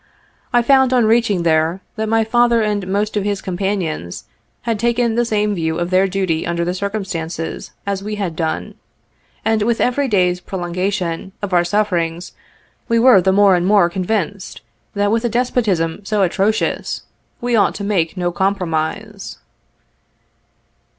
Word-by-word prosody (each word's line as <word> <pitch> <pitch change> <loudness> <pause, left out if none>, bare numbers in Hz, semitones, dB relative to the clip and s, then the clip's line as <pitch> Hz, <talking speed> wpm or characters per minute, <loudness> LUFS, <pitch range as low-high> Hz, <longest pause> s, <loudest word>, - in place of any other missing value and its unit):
I 240 -1 +3
found 265 0 +4
on 245 -3 +4
reaching 220 -5 +2
there, 160 +2 +2 0.2
that 220 -1 -2
my 225 0 +3
father 235 0 +3
and 205 -3 -1
most 205 +3 -1
of 205 - 0
his 200 -1 -1
companions 180 - -3 0.4
had 230 -3 -1
taken 235 0 +1
the 240 +1 +1
same 210 -2 0
view 160 -3 -1
of 175 +1 -2
their 185 +1 +4
duty 185 -4 -1
under 170 0 -1
the 175 - -1
circumstances, 185 -5 -4 0.2
as 200 -1 -2
we 210 +1 -4
had 190 -6 -3
done; 160 -1 -3 0.7
and 220 -1 +2
with 230 +2 +1
every 270 +3 +1
day's 180 -5 +2
prolongation 180 0 -3
of 195 -2 -3
our 175 -1 +4
sufferings, 175 -3 -1 0.6
we 230 - +2
were 230 -4 +6
the 190 - +2
more 200 0 +5
and 175 +1 0
more 195 -4 +4
convinced, 195 +1 -3 0.3
that 205 0 +1
with 225 +1 +1
a 240 - +1
despotism 210 -8 0
so 205 0 +1
atrocious, 200 +4 0 0.4
we 240 0 0
ought 200 -4 +3
to 200 - -5
make 185 -4 0
no 175 -1 0
compromise. 190 +2 -2
200 Hz, 155 wpm, -18 LUFS, 175-220 Hz, 0.7 s, were